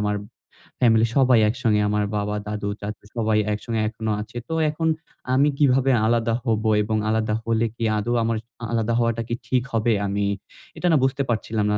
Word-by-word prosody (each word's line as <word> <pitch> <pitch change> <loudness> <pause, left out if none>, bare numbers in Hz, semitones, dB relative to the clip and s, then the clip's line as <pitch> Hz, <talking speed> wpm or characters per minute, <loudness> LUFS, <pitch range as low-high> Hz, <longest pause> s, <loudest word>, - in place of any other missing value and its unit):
আমার 105 0 0 0.6
ফ্যামিলি 115 -2 +4
সবাই 130 -4 +5
একসঙ্গে 110 -3 +1
আমার 105 0 +1
বাবা, 105 0 -2
দাদু, 105 -1 -3
চাচু 105 0 -6
সবাই 110 -2 +2
একসঙ্গে 110 +1 -2
এখনো 110 -1 -3
আছে। 115 +3 -9
তো 160 - -4 0.2
এখন 160 +2 -1 0.5
আমি 140 +3 +4
কিভাবে 135 -2 +3 0.2
আলাদা 115 0 +1
হব 110 -3 0 0.2
এবং 110 +1 -1
আলাদা 110 -1 +1
হলে 115 0 +1
কি 115 - -5
আদৌ 115 +3 -1
আমার 115 0 0 0.3
আলাদা 115 0 0
হওয়াটা 115 -1 +1
কি 120 - -1
ঠিক 125 -2 +1
হবে? 115 0 +2
আমি 100 +1 -1 0.5
এটা 180 - 0
না 155 - +5
বুঝতে 135 +1 +1
পারছিলাম 110 -2 -1
না। 105 - +2
115 Hz, 180 wpm, -23 LUFS, 105-120 Hz, 0.6 s, সবাই